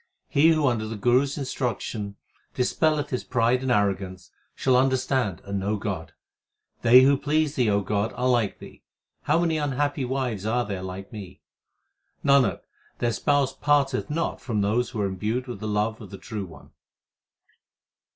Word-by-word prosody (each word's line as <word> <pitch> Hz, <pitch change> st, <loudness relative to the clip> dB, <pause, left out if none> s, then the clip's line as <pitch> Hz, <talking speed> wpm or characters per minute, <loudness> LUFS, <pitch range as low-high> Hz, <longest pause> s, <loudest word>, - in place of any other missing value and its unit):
He 150 Hz, +1 st, +4 dB
who 155 Hz, -2 st, +3 dB
under 115 Hz, -5 st, 0 dB
the 110 Hz, -, -5 dB
Guru 120 Hz, +5 st, +3 dB
s 140 Hz, +2 st, -5 dB
instruction 120 Hz, -6 st, -3 dB, 0.4 s
dispelleth 150 Hz, +3 st, +1 dB
his 125 Hz, -, -2 dB
pride 120 Hz, +2 st, +1 dB
and 130 Hz, -1 st, -1 dB
arrogance, 95 Hz, -4 st, -1 dB, 0.2 s
shall 130 Hz, -1 st, +2 dB
understand 130 Hz, -, +1 dB
and 100 Hz, 0 st, -3 dB
know 105 Hz, +2 st, -1 dB
God. 100 Hz, -, -5 dB, 0.7 s
They 125 Hz, +3 st, +8 dB
who 140 Hz, +1 st, +5 dB
please 150 Hz, +1 st, 0 dB
Thee, 125 Hz, -7 st, +1 dB
O 100 Hz, 0 st, +2 dB
God, 105 Hz, +2 st, -1 dB
are 125 Hz, -, 0 dB
like 120 Hz, -6 st, +1 dB
Thee; -, -, -13 dB, 0.4 s
how -, -, +3 dB
many 165 Hz, -2 st, +1 dB
unhappy 145 Hz, 0 st, -1 dB
wives 125 Hz, -5 st, -2 dB
there 110 Hz, +3 st, -2 dB
are 105 Hz, -6 st, -1 dB
like 95 Hz, +2 st, -7 dB
me: 95 Hz, -4 st, -9 dB, 0.8 s
Nanak, 140 Hz, -2 st, +4 dB, 0.4 s
their 120 Hz, -1 st, 0 dB
Spouse 140 Hz, +3 st, +1 dB
parteth 140 Hz, -2 st, +1 dB
not 165 Hz, +3 st, -2 dB
from 110 Hz, -5 st, -1 dB
those 110 Hz, +5 st, +1 dB
who 115 Hz, -4 st, -4 dB
are -, -, +1 dB
imbued 105 Hz, +6 st, -2 dB
with 120 Hz, -5 st, -7 dB
the 110 Hz, -, -4 dB
love 105 Hz, +1 st, -1 dB
of -, -, -10 dB
the 100 Hz, -, -8 dB
True 105 Hz, 0 st, -6 dB
One. 80 Hz, -, -15 dB
120 Hz, 170 wpm, -25 LUFS, 105-135 Hz, 0.8 s, They